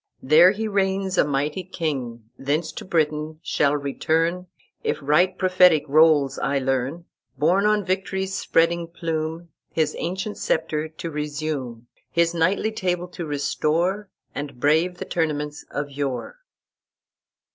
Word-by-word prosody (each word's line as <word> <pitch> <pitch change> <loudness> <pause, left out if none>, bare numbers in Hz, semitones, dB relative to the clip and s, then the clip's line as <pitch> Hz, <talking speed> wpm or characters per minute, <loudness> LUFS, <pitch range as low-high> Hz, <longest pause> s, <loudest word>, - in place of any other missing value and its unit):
There 155 +6 +7
he 215 +3 -2
reigns 195 -1 0
a - - +7
mighty 145 +5 -1
king, 130 -11 -4
Thence 150 +5 -1
to - - -8
Britain 155 -2 -1
shall 145 0 +1
return, 165 +5 -1 0.4
If - - 0
right 155 +6 +2
prophetic 180 -4 +5
rolls 150 -2 +4
I 140 +2 0
learn, 135 +5 -1 0.3
Borne 180 +8 +3
on 210 -2 +2
victory's 190 +1 -2
spreading 170 -1 +1
plume, 165 0 -4 0.2
His 160 -1 0
ancient 190 +4 -3
sceptre 155 0 -1
to 160 +1 -7
resume, 145 -5 -4 0.2
His 170 0 +2
knightly 185 +6 +1
table 180 -4 -2
to 175 -2 -6
restore, 170 +7 0 0.2
And 140 -3 -6
brave 160 +6 +2
the - - -5
tournaments 150 -3 -2
of 145 0 -4
yore." 140 - -4
160 Hz, 130 wpm, -23 LUFS, 145-180 Hz, 0.4 s, There